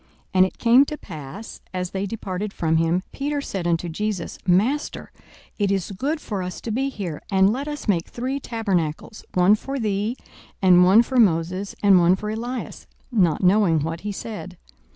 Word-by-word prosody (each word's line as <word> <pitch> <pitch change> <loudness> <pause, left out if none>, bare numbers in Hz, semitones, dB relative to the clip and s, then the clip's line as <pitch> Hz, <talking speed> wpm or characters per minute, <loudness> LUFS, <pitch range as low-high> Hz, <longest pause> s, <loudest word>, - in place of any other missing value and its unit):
42:009:033 - - -34 0.2
And 185 0 +6
it - - -13
came 245 +4 +5
to 300 - -5
pass, 165 - -9
as 180 -1 -3
they 195 +1 -2
departed 200 -1 -4
from 160 -1 +1
him, 165 +3 +1
Peter 290 +1 -2
said 195 -10 -4
unto 170 +1 0
Jesus, 190 +1 -3
Master, 225 +12 +1 0.5
it 200 -1 +2
is 195 -1 -1
good 280 - -2
for 205 -9 -4
us 180 0 -5
to 230 - -4
be 265 +5 0
here: 185 - -5
and 195 +1 +4
let 275 +4 -4
us 295 -3 -6
make 175 -5 +1
three 260 +3 -3
tabernacles; 200 - -2
one 180 +3 +5
for 270 +6 -2
thee, 215 +1 -1 0.4
and 180 -2 +6
one 195 +6 +6
for 260 +2 -3
Moses, 185 -1 +1
and 195 -2 +7
one 175 +1 +5
for 210 +2 -4
Elias: 240 +3 -5 0.2
not 185 -8 +2
knowing 180 -4 +4
what 165 +2 -3
he 210 - -3
said. 200 -3 -7
200 Hz, 185 wpm, -23 LUFS, 180-230 Hz, 0.5 s, and